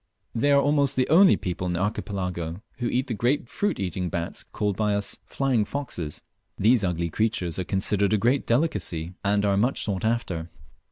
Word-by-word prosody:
They 145 Hz, +5 st, +2 dB
are 140 Hz, -, +6 dB
almost 140 Hz, -1 st, +2 dB
the 130 Hz, -, +2 dB
only 185 Hz, +5 st, +7 dB
people 90 Hz, -2 st, -3 dB
in 90 Hz, -, -1 dB
the 85 Hz, -, -1 dB
Archipelago 90 Hz, -3 st, -3 dB, 0.2 s
who 120 Hz, -, -1 dB
eat 130 Hz, +1 st, 0 dB
the 125 Hz, -, -3 dB
great 120 Hz, +5 st, 0 dB
fruit 205 Hz, -, -1 dB
eating 90 Hz, -1 st, -2 dB
bats 85 Hz, -1 st, -4 dB
called 105 Hz, -2 st, -2 dB
by 105 Hz, 0 st, +1 dB
us 100 Hz, 0 st, -2 dB
"flying 130 Hz, -5 st, +1 dB
foxes." 105 Hz, -, -4 dB, 0.3 s
These 115 Hz, +2 st, +4 dB
ugly 85 Hz, -2 st, -1 dB
creatures 95 Hz, -5 st, -1 dB
are -, -, 0 dB
considered 100 Hz, +2 st, +1 dB
a 110 Hz, -, +4 dB
great 125 Hz, +6 st, +1 dB
delicacy, 95 Hz, -, 0 dB
and 100 Hz, 0 st, +2 dB
are 100 Hz, -1 st, +2 dB
much 120 Hz, +6 st, +1 dB
sought 100 Hz, -3 st, -2 dB
after. 95 Hz, -8 st, -1 dB
105 Hz, 185 wpm, -25 LUFS, 90-125 Hz, 0.3 s, only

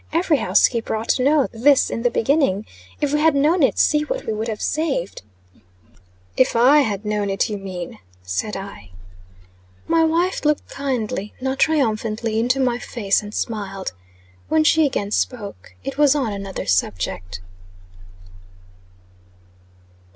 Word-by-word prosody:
Every 330 Hz, -1 st, +2 dB
housekeeper 230 Hz, -4 st, +2 dB
ought 220 Hz, +1 st, -5 dB
to 255 Hz, -, +2 dB
know 285 Hz, 0 st, +3 dB
this 260 Hz, +4 st, +3 dB
in 230 Hz, -, -3 dB
the 245 Hz, -, +2 dB
beginning. 235 Hz, -6 st, +1 dB, 0.4 s
If 290 Hz, -1 st, 0 dB
we 300 Hz, -, +2 dB
had 315 Hz, -1 st, +3 dB
known 310 Hz, +5 st, +3 dB
it, 270 Hz, -, +3 dB
see 300 Hz, -1 st, +3 dB
what -, -, -4 dB
we -, -, -2 dB
would 220 Hz, +2 st, -3 dB
have 220 Hz, -2 st, -4 dB
saved." 295 Hz, -, -2 dB, 1.1 s
"If 255 Hz, -, +2 dB
I 255 Hz, +6 st, +6 dB
had 210 Hz, -6 st, -1 dB
known 210 Hz, -1 st, -1 dB
it, 195 Hz, +3 st, 0 dB
you 205 Hz, -, -3 dB
mean," 185 Hz, -3 st, -7 dB, 0.2 s
said 90 Hz, -, -3 dB
I. 195 Hz, -, -9 dB, 1.0 s
My 330 Hz, 0 st, +3 dB
wife 340 Hz, +4 st, +1 dB
looked 300 Hz, -1 st, +1 dB
kindly, 230 Hz, -7 st, -3 dB
not 265 Hz, +1 st, -3 dB
triumphantly, 225 Hz, -6 st, +1 dB
into 250 Hz, +4 st, +1 dB
my 245 Hz, -2 st, +1 dB
face, 205 Hz, -5 st, 0 dB
and 205 Hz, 0 st, -9 dB
smiled. 200 Hz, -4 st, -4 dB, 0.6 s
When 315 Hz, 0 st, +3 dB
she 315 Hz, 0 st, +4 dB
again 205 Hz, -6 st, -3 dB
spoke, 210 Hz, -4 st, -3 dB
it 275 Hz, +1 st, -5 dB
was 295 Hz, -1 st, +5 dB
on 255 Hz, -8 st, -1 dB
another 195 Hz, -1 st, -5 dB
subject. 95 Hz, 0 st, -1 dB
235 Hz, 145 wpm, -21 LUFS, 205-290 Hz, 1.1 s, I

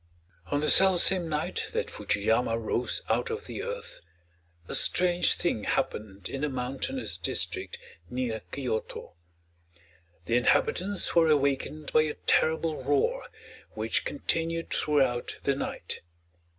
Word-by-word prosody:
On 145 Hz, +6 st, 0 dB
the 150 Hz, -, +2 dB
self 190 Hz, -2 st, +7 dB
same 180 Hz, -3 st, +4 dB
night 150 Hz, 0 st, -2 dB
that -, -, -2 dB
Fuji 100 Hz, -, -1 dB
yama 115 Hz, +2 st, +2 dB
rose 115 Hz, +2 st, -2 dB
out -, -, 0 dB
of 450 Hz, 0 st, -4 dB
the -, -, -6 dB
earth, 485 Hz, 0 st, -6 dB, 0.7 s
a -, -, -5 dB
strange 180 Hz, -1 st, +2 dB
thing 110 Hz, -11 st, -1 dB
happened 100 Hz, -3 st, -2 dB
in 135 Hz, -, -5 dB
the 150 Hz, -, 0 dB
mountainous 135 Hz, -, -3 dB
district 390 Hz, +5 st, -2 dB, 0.3 s
near 125 Hz, -3 st, -2 dB
Kyoto. 125 Hz, -5 st, -4 dB, 1.1 s
The 115 Hz, -, +2 dB
inhabitants 185 Hz, +9 st, +2 dB
were 165 Hz, -1 st, +6 dB
awakened 145 Hz, +1 st, 0 dB
by 155 Hz, -, +6 dB
a 155 Hz, -1 st, -2 dB
terrible 160 Hz, -2 st, +1 dB
roar, 475 Hz, -, +1 dB, 0.5 s
which -, -, 0 dB
continued 165 Hz, -10 st, -1 dB
throughout 135 Hz, -5 st, +1 dB
the 140 Hz, -, +1 dB
night. -, -, -4 dB
150 Hz, 130 wpm, -28 LUFS, 125-175 Hz, 1.1 s, self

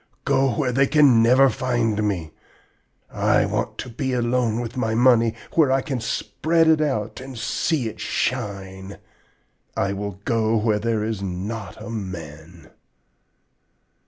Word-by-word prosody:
Go 135 Hz, -2 st, +2 dB
where 135 Hz, -5 st, 0 dB
they 135 Hz, +2 st, +3 dB
can 140 Hz, -7 st, +5 dB
never 130 Hz, +4 st, +6 dB
find 120 Hz, -5 st, 0 dB
me! 90 Hz, -7 st, -2 dB, 0.8 s
I -, -, +2 dB
want -, -, -3 dB
to -, -, -5 dB
be 130 Hz, +2 st, -3 dB
alone 120 Hz, -2 st, 0 dB
with 120 Hz, -1 st, -5 dB
my 110 Hz, -3 st, -1 dB
money, 115 Hz, -2 st, +4 dB, 0.2 s
where 150 Hz, -5 st, +3 dB
I 135 Hz, 0 st, +2 dB
can 135 Hz, -6 st, -3 dB
spread 160 Hz, +7 st, 0 dB
it 160 Hz, -1 st, +4 dB
out 130 Hz, -7 st, -2 dB
and 130 Hz, -1 st, -9 dB
see 140 Hz, +2 st, -1 dB
it 110 Hz, -1 st, -8 dB
shine! 100 Hz, -6 st, -3 dB, 0.8 s
I 100 Hz, 0 st, 0 dB
will 100 Hz, -1 st, -5 dB
go 115 Hz, -1 st, +1 dB
where 105 Hz, -1 st, +1 dB
there 110 Hz, -1 st, -1 dB
is 110 Hz, -2 st, -3 dB
not 100 Hz, +3 st, -5 dB
a 115 Hz, +1 st, -8 dB
man!' 85 Hz, -5 st, -8 dB
115 Hz, 145 wpm, -23 LUFS, 105-130 Hz, 0.8 s, never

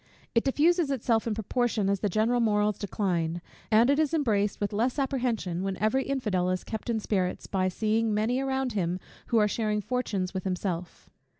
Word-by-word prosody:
It 230 Hz, -, +3 dB
diffuses 320 Hz, +3 st, +3 dB
itself 235 Hz, -4 st, +1 dB
in 220 Hz, -, 0 dB
proportion 220 Hz, -1 st, 0 dB
as 200 Hz, 0 st, +1 dB
the 205 Hz, -, 0 dB
general 220 Hz, +5 st, +2 dB
morals 210 Hz, -2 st, +2 dB
decline; 175 Hz, -5 st, -1 dB, 0.3 s
and 225 Hz, +2 st, +5 dB
it 280 Hz, +2 st, +3 dB
is 315 Hz, +1 st, +2 dB
embraced 210 Hz, -9 st, +1 dB
with 205 Hz, 0 st, -2 dB
less 240 Hz, +6 st, 0 dB
apprehension, 245 Hz, -10 st, -1 dB
when 195 Hz, -1 st, -2 dB
every 220 Hz, +6 st, +1 dB
infidel 210 Hz, -10 st, 0 dB
is 185 Hz, 0 st, -1 dB
kept 220 Hz, +1 st, -6 dB
in 225 Hz, -1 st, +1 dB
spirits, 190 Hz, -4 st, -1 dB
by 185 Hz, -1 st, 0 dB
seeing 220 Hz, +4 st, 0 dB
many 220 Hz, +5 st, +1 dB
around 265 Hz, -2 st, -1 dB
him 180 Hz, -3 st, -1 dB, 0.3 s
who 235 Hz, -, +2 dB
are 210 Hz, -1 st, +5 dB
sharing 210 Hz, 0 st, 0 dB
fortunes 205 Hz, -5 st, -2 dB
with 190 Hz, -1 st, -3 dB
himself. 180 Hz, -2 st, -4 dB
215 Hz, 185 wpm, -28 LUFS, 195-245 Hz, 0.3 s, and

